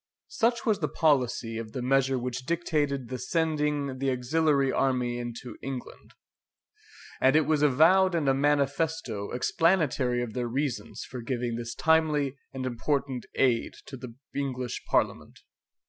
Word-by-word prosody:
Such 235 +1 +1
was 215 -3 +2
the 155 - 0
policy 125 -7 +1
of 110 -1 -7
the 130 - -3
measure 135 0 +2
which 125 +1 -4
dictated 145 -7 -1
the 130 -1 -4
sending 150 -4 -1
the 135 0 0
auxiliary 140 +2 +2
army 125 -2 0
into 120 +1 -7
England; 130 -2 -7 1.0
and 130 +2 +4
it 155 -1 +4
was 155 -2 +1
avowed 170 +7 +5
in 155 -4 0
a 135 - +5
manifesto 140 -5 0
explanatory 135 -4 +1
of 115 -3 -6
their 125 -1 -2
reasons 120 -3 -3
for 125 - -7
giving 120 0 -2
this 115 0 -5
timely 155 -4 +2 0.2
and 130 -1 -5
important 130 +1 -2
aid 120 -3 +1
to 135 - -8
the 125 -2 -9 0.2
English 130 -3 -3
Parliament. - - 0
135 Hz, 145 wpm, -28 LUFS, 125-150 Hz, 1.0 s, avowed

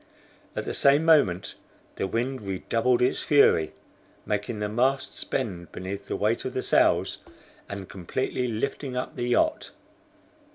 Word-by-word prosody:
At - - -3
the - - -3
same 140 +3 +4
moment 100 - +3 0.4
the - - -1
wind 125 +5 -2
redoubled 115 +5 0
its 125 - +1
fury, 140 - +4 0.5
making 105 +2 -2
the 105 0 -2
masts 130 +5 0
bend 95 -10 -3
beneath 100 +2 -6
the - - -2
weight 110 +3 0
of 130 - -5
the 130 - -1
sails, - - +2 0.5
and 100 -2 -6
completely 125 +7 -3
lifting 125 +3 -3
up 125 - -4
the 120 - -2
yacht. 125 - +1
115 Hz, 140 wpm, -26 LUFS, 100-130 Hz, 0.5 s, same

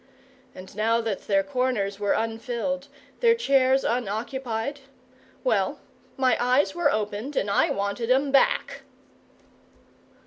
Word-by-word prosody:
And 185 +2 -11
now 225 +2 +2
that 220 -4 -4
their 195 -1 +3
corners 245 -6 -1
were 205 -1 +1
unfilled, 235 +5 -2 0.3
their 465 -1 +5
chairs 270 - +3
unoccupied 240 +3 -2 0.6
well, - - +1 0.4
my 255 -3 +3
eyes 255 +4 +2
were 345 +1 +2
opened 215 +6 -3
and 200 - 0
I - - +3
wanted 200 +4 -2
'em 270 +2 +3
back! 275 - +2
240 Hz, 115 wpm, -25 LUFS, 210-270 Hz, 0.6 s, their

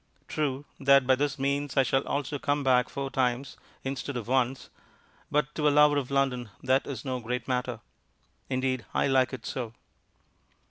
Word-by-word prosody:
True 145 -2 -2
that 140 -1 +5
by 130 - +5
this 140 +1 0
means 140 +1 -1
I 135 - +6
shall 135 +2 +2
also 145 0 -2
come 145 0 0
back 125 -2 +3
four 140 -1 -4
times 130 +1 0 0.3
instead 135 0 -3
of 115 - -5
once, 130 0 0 0.6
but 150 0 0
to 150 -1 +1
a - - +7
lover 145 0 +5
of 135 -3 -2
London 135 -4 0
that 130 +1 +2
is 130 -3 -6
no 130 -1 -2
great 125 +1 -4
matter. 125 -2 -2 0.7
Indeed, 130 -2 0
I - - +3
like 130 -2 +3
it 130 - -7
so. 115 -3 -4
135 Hz, 175 wpm, -28 LUFS, 125-140 Hz, 0.7 s, a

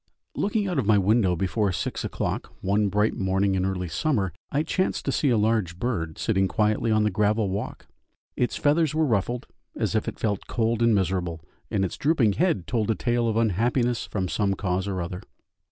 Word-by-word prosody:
Looking 205 0 0
out 175 -6 0
of 110 - -1
my 110 -1 +5
window 100 -1 +3
before 100 +3 0
six 85 - -3
o'clock - - -3
one 100 +2 +1
bright 105 +3 +2
morning 95 -1 +1
in 95 -1 0
early 90 -2 -2
summer, 95 - 0 0.2
I 145 +2 +1
chanced 185 +3 -1
to - - +1
see 145 - +1
a 120 - +3
large 105 -5 +1
bird 85 -9 -2
sitting 95 -4 +1
quietly 110 +3 +1
on 110 0 +3
the 105 - +1
gravel 105 0 +1
walk. 100 - -5 0.5
Its 125 - 0
feathers 155 +1 +2
were 160 0 +3
ruffled 120 0 0 0.3
as - - -1
if - - 0
it - - -4
felt 105 -3 -2
cold 115 -1 0
and 115 -2 +4
miserable, 90 -3 -1 0.3
and 95 -2 +1
its 90 - -5
drooping 135 -9 +2
head 155 - +1
told 115 0 -1
a 110 - +2
tale 120 +1 0
of 110 -1 0
unhappiness 120 +3 +1
from 95 -3 -2
some 100 0 0
cause 95 0 -1
or 95 -3 -2
other. 90 +1 -6
105 Hz, 200 wpm, -25 LUFS, 95-120 Hz, 0.5 s, my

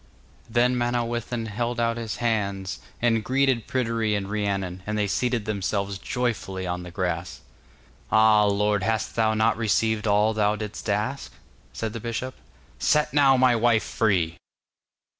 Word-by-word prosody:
Then 120 +2 +2
Manawyddan 120 -1 -1
held 120 +2 -3
out 115 0 +1
his 115 -2 -4
hands 100 -5 -2 0.2
and 115 -2 +2
greeted 130 -1 +1
Pryderi 115 -4 0
and 100 -1 -3
Rhiannon, 95 -3 -2
and 105 0 -1
they 105 - +1
seated 120 +2 -1
themselves 100 -1 -2
joyfully 110 -7 -2
on 90 0 -3
the 90 - -8
grass. 90 0 -3 0.7
'Ah, 110 -1 +5
lord, 105 0 +1
hast 110 +3 -1
thou 110 -1 +2
not 110 0 +2
received 110 0 +1
all 105 +2 +3
thou 105 -1 +2
didst 105 -1 -6
ask?' - - -2 0.4
said 110 -1 -4
the 115 - -5
bishop. 120 +3 -4 0.5
'Set 150 0 +2
now 140 -2 +5
my 125 -1 +4
wife 115 -1 +3
free! 90 -7 0
110 Hz, 145 wpm, -25 LUFS, 100-120 Hz, 0.7 s, Ah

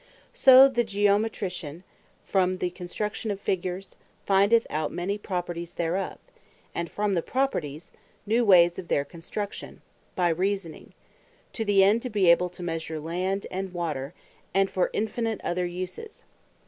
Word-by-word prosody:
So 265 0 +8
the 240 -3 +1
Geometrician, 200 -6 -1 0.4
from 185 -1 +1
the 180 -1 -2
Construction 200 +5 -4
of 200 -1 -2
Figures, 185 0 -3 0.3
findeth 200 +4 +4
out 155 0 -1
many 195 +4 -3
Properties 175 -3 -4
thereof; 175 +3 -2 0.6
and 170 -1 -3
from 205 -1 -1
the 170 - +1
Properties, 170 - -2 0.3
new 225 +3 +2
Ways 175 -5 +5
of 175 - -8
their 140 - +1
Construction, 195 +6 -7 0.3
by 175 -1 +2
Reasoning; 185 0 -2 0.6
to 225 - -2
the 200 -2 +4
end 210 +4 +4
to 250 - -4
be 200 -6 +4
able 180 +1 +3
to 180 0 -10
measure 165 -2 -4
Land 185 +5 -2
and 190 0 -4
Water; 155 -4 -3 0.4
and 195 0 +3
for 185 - +1
infinite 220 0 -2
other 180 0 -1
uses. 185 - -7
185 Hz, 145 wpm, -26 LUFS, 175-205 Hz, 0.6 s, So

